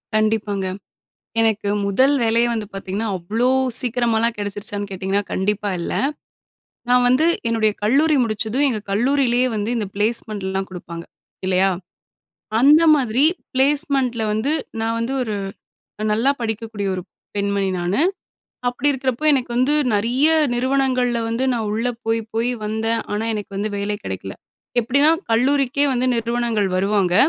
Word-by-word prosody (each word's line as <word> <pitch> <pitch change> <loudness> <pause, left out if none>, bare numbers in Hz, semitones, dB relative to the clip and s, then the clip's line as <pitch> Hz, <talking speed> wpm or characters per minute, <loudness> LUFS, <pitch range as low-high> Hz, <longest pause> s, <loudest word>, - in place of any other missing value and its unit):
கண்டிப்பாங்க. 215 -2 0 0.8
எனக்கு 220 -2 +1 0.2
முதல் 260 +8 +3
வேலையே 230 +1 +3
வந்து 220 -2 -3
பார்த்தீங்கன்னா, 195 +3 -3
அவ்ளோ 220 +8 0 0.3
சீக்கிரமாலாம் 235 -2 +1
கெடச்சிருச்சான்னு 205 0 -5
கேட்டிங்கனா 195 +1 -1
கண்டிப்பா 205 +2 -1
இல்ல. - - -3 1.0
நான் 250 0 +4
வந்து 255 +6 +4 0.2
என்னுடைய 225 -2 +2
கல்லூரி 290 +8 +3
முடிச்சதும் 220 +5 0
எங்க 220 - -1
கல்லூரியிலேயே 250 +2 +2
வந்து 210 +2 -2
இந்த 210 -3 -2
பிளேஸ்மெண்ட்லாம் 205 -3 -1
குடுப்பாங்க 170 -2 -8 0.4
இல்லயா! 190 +1 +3 0.9
அந்த 295 +5 +6
மாதிரி 255 0 +1 0.3
பிளேஸ்மெண்ட்ல 270 -3 +1
வந்து 220 +7 0 0.3
நான் 225 0 -1
வந்து 240 +4 -2
ஒரு 220 -4 -2 0.8
நல்லா 245 +6 +3
படிக்கக்கூடிய 220 -2 -3
ஒரு 185 - -4 0.3
பெண்மணி 200 -1 0
நானு. 175 +8 0 0.7
அப்பிடி 245 +4 +1
இருக்கிறப்போ, 265 +1 -2
எனக்கு 255 -3 0
வந்து 260 +4 +3 0.2
நெறைய 240 +8 +2 0.3
நிறுவனங்கள்ல 255 -1 +1
வந்து 230 +3 -1
நான் 225 -3 -2
உள்ள 230 +3 -1 0.2
போய், 225 0 +1
போய் 230 +2 +1
வந்தேன். 220 +2 -1
ஆனா, 210 +2 -1
எனக்கு 205 -1 -5
வந்து 205 +2 -1
வேலை 205 +1 -2
கெடைக்கல. - - -5 0.5
எப்பிடின்னா 280 +6 +3 0.2
கல்லூரிக்கே 275 +3 +2
வந்து 255 0 0
நிறுவனங்கள் 230 -3 0
வருவாங்க. 195 -1 +1
225 Hz, 130 wpm, -21 LUFS, 205-250 Hz, 1.0 s, அந்த